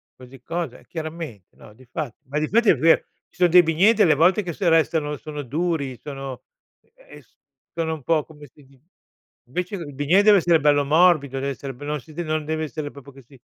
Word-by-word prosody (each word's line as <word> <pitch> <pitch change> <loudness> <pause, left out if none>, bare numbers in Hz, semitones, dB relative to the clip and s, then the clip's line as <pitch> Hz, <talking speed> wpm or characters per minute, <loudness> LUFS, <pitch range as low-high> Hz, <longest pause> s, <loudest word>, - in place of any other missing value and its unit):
così 130 0 -15
cosa, 165 -2 -4
eh - - -22
chiaramente 160 - -8
no 105 - -15
di 130 +4 -19
fa 145 -7 -4
ma 145 +3 -2
di 155 - -1
fatti 230 +3 +3
è - - +6
vero: 165 +1 +4 0.3
ci - - -31
son 180 -1 +4
dei 180 +2 +8
bignè 170 +7 +4
delle 205 -8 +4
volte 180 +7 +3
che 175 -2 -5
se 180 +1 0
restano 160 -2 +1
sono 150 +1 -7
duri, 145 -1 -2
sono 135 -2 -7 0.5
ehm, - - -16 0.5
sono 160 -1 -2
un 150 - -13
po' 155 +3 +1
come 150 -2 -15
si 145 - -20
di 135 -1 -24 0.7
invece 180 +9 -4
il 160 -6 -7
bignè 145 +9 +3
deve 210 -1 +7
essere 170 -3 +3
bello 145 -1 +3
morbido, 150 -3 +3
deve 140 +1 -2
essere 135 0 -7
be 125 - -13
non 150 0 -2
si 155 +4 -16
de 175 - -4
non 155 -1 -2
deve 155 +1 -2
essere 150 -1 -6
proprio 140 0 -13
che 135 0 -16
si 135 +3 -19
155 Hz, 220 wpm, -22 LUFS, 140-170 Hz, 0.7 s, dei